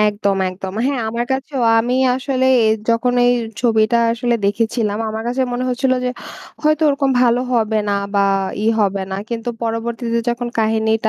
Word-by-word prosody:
একদম, 205 -1 +1
একদম। 185 +1 -7
হ্যাঁ 275 -3 -1
আমার 235 +2 -2
কাছেও 265 0 -3 0.2
আমি 240 +2 0 0.2
আসলে 260 0 -1 0.2
এ - - +3 0.2
যখন 230 +2 +2
এই 245 - +5 0.3
ছবিটা 230 -1 +2 0.2
আসলে 240 +1 0
দেখেছিলাম 215 +1 0
আমার 220 +1 -4
কাছে 255 +2 0
মনে 245 +1 -2
হচ্ছিল 255 +1 0
যে, - - +1 0.5
হয়তো 305 0 +2
ওরকম 275 -1 +1
ভালো 240 0 +3
হবে 220 -2 +1
না। - - +1 0.2
বা 200 0 +3 0.4
ই - - +1
হবে 200 -1 0
না। 190 - -3
কিন্তু 235 0 -4
পরবর্তীতে 230 +1 -2
যখন 240 0 -2
কাহিনীটা 220 0 +1
235 Hz, 170 wpm, -18 LUFS, 220-250 Hz, 0.5 s, এই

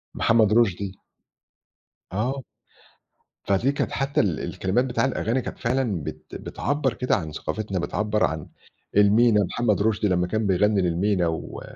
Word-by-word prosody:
محمد 110 -2 +3
رُشدي. 100 -4 +1 1.1
آه. 125 +8 -2 1.0
فدي 105 +8 +2
كانت 140 - -2
حتّى 135 +1 +1
ال 90 -7 0
الكلمات 105 +7 -1
بتاع 130 +1 0
الأغاني 125 -1 0
كانت - - -7
فعلًا 115 - 0
بت - - -8
بتعبّر 145 -2 -2
كده 125 -3 0
عن 80 -7 -4
ثقافتنا، 100 +4 -3
بتعبّر 105 +4 -1
عن 75 0 -4 0.5
المينا 105 +1 +5
محمد 105 +2 0
رُشدي 105 -1 +1
لمّا 90 -2 +1
كان 110 +2 -1
بيغنّي 100 +2 +3
للمينا 90 +1 +1
و 80 0 -4
105 Hz, 140 wpm, -24 LUFS, 95-120 Hz, 1.1 s, المينا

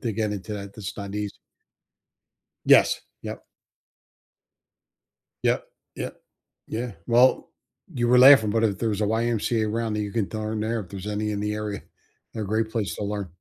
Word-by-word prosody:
to 115 -3 -1
get 105 0 -1
into 105 +1 -5
that, 100 -1 -7
that's 105 -4 -7
not 100 -1 -6
easy. 105 -1 -3 1.3
Yes. - - +5 0.2
Yep. - - -7 2.0
Yep. - - +1 0.3
Yeah. - - -3 0.6
Yeah, 115 -1 -4
well, 125 +2 +4 0.4
you 120 -1 0
were 125 +1 +5
laughing, 130 -4 +8
but 115 +2 +1
if 100 -4 +1
there's 110 -3 -1
a 105 - +2
YMCA 110 0 0
around 115 0 -1
that 105 - -1
you 105 -1 -4
can 110 -4 0
throw 110 -1 -4
in 105 - -2
there, 115 +1 -1
if 95 -4 -8
there's 100 0 -7
any 105 0 -2
in 100 - -3
the 105 0 -1
area, 105 -1 -4 0.5
they're 110 - -3
a - - -5
great 110 +2 0
place 110 -4 -2
to - - -4
learn. 100 -2 -3
105 Hz, 180 wpm, -25 LUFS, 105-115 Hz, 2.0 s, laughing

